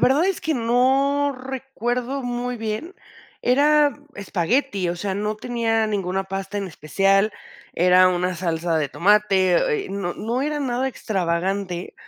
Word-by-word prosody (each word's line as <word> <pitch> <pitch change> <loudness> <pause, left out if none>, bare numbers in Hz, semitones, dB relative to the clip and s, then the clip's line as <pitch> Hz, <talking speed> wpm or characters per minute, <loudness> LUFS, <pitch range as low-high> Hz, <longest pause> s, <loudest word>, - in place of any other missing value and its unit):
verdad 280 +6 +4
es 385 -1 0
que 315 - -1
no 270 +4 +2
recuerdo 260 0 -3
muy 245 0 -3
bien, 225 - -4 0.5
era 290 +3 +4 0.2
espagueti, 200 - -1
o 175 - -2
sea, 195 +2 -3
no 210 +1 -2
tenía 225 -1 0
ninguna 195 -2 -2
pasta 195 +1 -5
en 200 -1 -2
especial, 195 +5 +1 0.4
era 180 +1 +5
una 180 0 0
salsa 165 -1 -1
de 150 -2 -1
tomate, 205 - +2
eh, - - -8
no 195 -3 -3
no 235 +4 -2
era 295 +1 -1
nada 260 -1 -1
extravagante, 185 -4 -2
215 Hz, 140 wpm, -22 LUFS, 185-260 Hz, 0.5 s, era